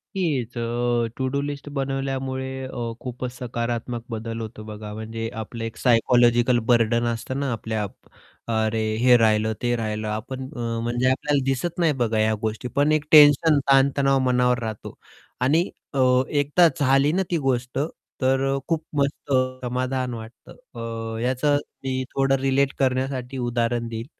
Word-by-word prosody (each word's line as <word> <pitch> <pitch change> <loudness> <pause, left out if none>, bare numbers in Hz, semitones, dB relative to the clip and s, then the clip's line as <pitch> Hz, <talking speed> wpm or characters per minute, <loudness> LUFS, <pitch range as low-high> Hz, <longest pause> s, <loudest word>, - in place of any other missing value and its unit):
हीच 135 - -1
अ, 120 0 0
टू-डू-लिस्ट 140 +2 -3
बनवल्यामुळे 135 -1 -2
अ, 120 -3 -4
खूपच 125 0 -5
सकारात्मक 120 -1 -3
बदल 115 0 -4
होतो 110 -1 -7
बघा. 105 -1 -8
म्हणजे 110 +1 -5
आपलं 115 +1 -7
एक 115 - -5
सायकॉलॉजिकल 120 0 +4
बर्डन 115 0 +3
असतं 130 +4 -4
ना, 140 -2 -1
आपल्या 110 -1 -2 0.7
अरे 110 0 +1 0.2
हे 125 -1 +7
राहिलं 110 -1 +2
ते 120 0 +1
राहिलं 110 -1 -3
आपण 130 +5 -4
अ, 115 -1 -3
म्हणजे 120 +2 +1
आपल्याला 140 +1 0
दिसत 145 +7 -1
नाही 160 -3 +3
बघा 110 -1 0
ह्या 110 0 +3
गोष्टी. 110 +3 -3
पण 145 +5 +1
एक 155 -1 +1
टेन्शन 150 0 +7
ताण-तणाव 135 0 +4
मनावर 125 0 +2
राहतो 110 -2 -6 0.5
आणि 160 +8 +2 0.2
अ, 135 - -1 0.3
एकदा 145 +4 +4
झाली 135 +1 +3
ना, 190 +3 +1
ती 170 - +2
गोष्ट 125 0 -1 0.4
तर 130 +1 +2
अ, - - 0
खूप 165 -1 0 0.2
मस्त 140 0 -2 0.3
समाधान 130 0 -2
वाटतं 115 +1 -10 0.3
अ, 115 -1 -5
याचं 130 +3 +2 0.3
मी 130 -1 -1
थोडं 135 0 +3
रिलेट 135 +1 +2
करण्यासाठी 130 0 -1
उदाहरण 120 0 0
देईन. 115 0 -5
125 Hz, 145 wpm, -24 LUFS, 115-135 Hz, 0.7 s, हे